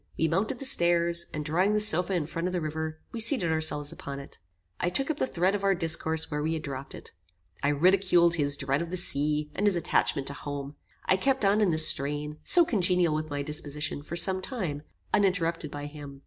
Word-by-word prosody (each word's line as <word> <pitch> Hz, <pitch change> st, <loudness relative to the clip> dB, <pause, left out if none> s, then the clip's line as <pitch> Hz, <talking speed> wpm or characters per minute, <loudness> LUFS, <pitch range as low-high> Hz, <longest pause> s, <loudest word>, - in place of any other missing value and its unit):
We 160 Hz, -, +1 dB
mounted 200 Hz, -, -2 dB
the 275 Hz, -, -5 dB
stairs, 170 Hz, -6 st, +4 dB
and 150 Hz, -1 st, -6 dB
drawing 185 Hz, +7 st, 0 dB
the 210 Hz, -, +1 dB
sofa 190 Hz, -2 st, +6 dB
in 170 Hz, -5 st, -1 dB
front 165 Hz, +3 st, -4 dB
of 180 Hz, -, -5 dB
the 180 Hz, -, -1 dB
river, 155 Hz, 0 st, -5 dB
we 235 Hz, -, -6 dB
seated 225 Hz, -, +2 dB
ourselves 155 Hz, -2 st, 0 dB
upon 140 Hz, 0 st, -8 dB
it. 140 Hz, -, -12 dB, 0.4 s
I 175 Hz, -, -1 dB
took 270 Hz, -, 0 dB
up 300 Hz, -, -6 dB
the -, -, -1 dB
thread 185 Hz, 0 st, 0 dB
of 205 Hz, -1 st, -4 dB
our 195 Hz, -1 st, +2 dB
discourse 160 Hz, -1 st, 0 dB
where 150 Hz, 0 st, -3 dB
we 160 Hz, +2 st, -2 dB
had 160 Hz, -1 st, -5 dB
dropped 140 Hz, -1 st, -7 dB
it. -, -, -8 dB, 0.5 s
I -, -, -1 dB
ridiculed 175 Hz, +3 st, +2 dB
his 145 Hz, -3 st, +1 dB
dread 140 Hz, +2 st, -1 dB
of 170 Hz, -, -6 dB
the 185 Hz, -, -4 dB
sea, 150 Hz, -2 st, 0 dB
and 205 Hz, -, -1 dB
his 200 Hz, -, +1 dB
attachment 150 Hz, -4 st, -1 dB
to -, -, -7 dB
home. 145 Hz, +1 st, -7 dB, 0.3 s
I 190 Hz, -, +2 dB
kept 260 Hz, +1 st, 0 dB
on 205 Hz, +2 st, +2 dB
in 205 Hz, -, +2 dB
this 160 Hz, -1 st, +3 dB
strain, 150 Hz, +2 st, -1 dB
so 345 Hz, -1 st, +7 dB
congenial 180 Hz, -, +1 dB
with 155 Hz, 0 st, -4 dB
my 145 Hz, -1 st, -4 dB
disposition, 150 Hz, -1 st, -3 dB
for 155 Hz, +3 st, -8 dB
some 185 Hz, +2 st, +5 dB
time, 185 Hz, -, -4 dB, 0.3 s
uninterrupted 175 Hz, -6 st, 0 dB
by 145 Hz, 0 st, -8 dB
him. 145 Hz, -2 st, -11 dB
165 Hz, 220 wpm, -26 LUFS, 150-185 Hz, 0.5 s, so